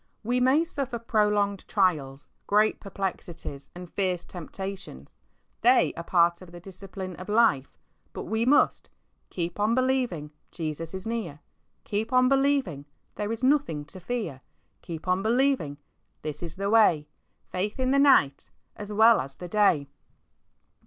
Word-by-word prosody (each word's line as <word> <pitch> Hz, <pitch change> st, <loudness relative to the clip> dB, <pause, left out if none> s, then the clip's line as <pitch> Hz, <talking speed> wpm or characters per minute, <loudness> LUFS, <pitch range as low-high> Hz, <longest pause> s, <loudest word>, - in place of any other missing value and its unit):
We 245 Hz, +3 st, +1 dB
may 260 Hz, +6 st, +4 dB
suffer 275 Hz, -7 st, -3 dB
prolonged 210 Hz, -3 st, 0 dB
trials, 150 Hz, -9 st, 0 dB, 0.2 s
great 210 Hz, +1 st, +3 dB
perplexities, 175 Hz, -7 st, -5 dB
and 180 Hz, 0 st, -8 dB
fierce 180 Hz, -1 st, -2 dB
temptations 185 Hz, -, -8 dB, 0.2 s
— -, -, -44 dB
they -, -, +5 dB
are -, -, -6 dB
a -, -, -9 dB
part 170 Hz, 0 st, +2 dB
of 180 Hz, -2 st, -13 dB
the 175 Hz, -, -10 dB
discipline 190 Hz, 0 st, -8 dB
of 185 Hz, +3 st, -9 dB
life 205 Hz, -, +2 dB, 0.2 s
— -, -, -42 dB
but -, -, -5 dB
we 220 Hz, +1 st, -1 dB
must 270 Hz, +5 st, +3 dB, 0.4 s
Keep 175 Hz, +1 st, -4 dB
on 215 Hz, +3 st, +2 dB
believing, 255 Hz, -, 0 dB, 0.2 s
Jesus 160 Hz, +1 st, -5 dB
is 190 Hz, -, -6 dB
near. 225 Hz, -10 st, -4 dB, 0.4 s
Keep 215 Hz, +3 st, -3 dB
on 255 Hz, 0 st, +5 dB
believing, 270 Hz, -, +1 dB, 0.3 s
there's 220 Hz, +3 st, -4 dB
nothing 260 Hz, -, +1 dB
to 185 Hz, +5 st, -12 dB
fear; 180 Hz, -, -4 dB, 0.4 s
Keep 165 Hz, +1 st, -8 dB
on 185 Hz, +1 st, +2 dB
believing, 235 Hz, -, +1 dB, 0.5 s
this 150 Hz, -1 st, -5 dB
is 170 Hz, -2 st, -5 dB
the 200 Hz, +1 st, -2 dB
way, 175 Hz, -10 st, +4 dB, 0.4 s
Faith 205 Hz, +6 st, -3 dB
in 260 Hz, 0 st, +1 dB
the 275 Hz, -, +4 dB
night 205 Hz, -, +4 dB, 0.3 s
as 210 Hz, -1 st, -8 dB
well 220 Hz, +2 st, +6 dB
as 135 Hz, +1 st, -7 dB
the 180 Hz, -, -8 dB
day. 180 Hz, -8 st, +2 dB
195 Hz, 150 wpm, -27 LUFS, 170-230 Hz, 0.5 s, well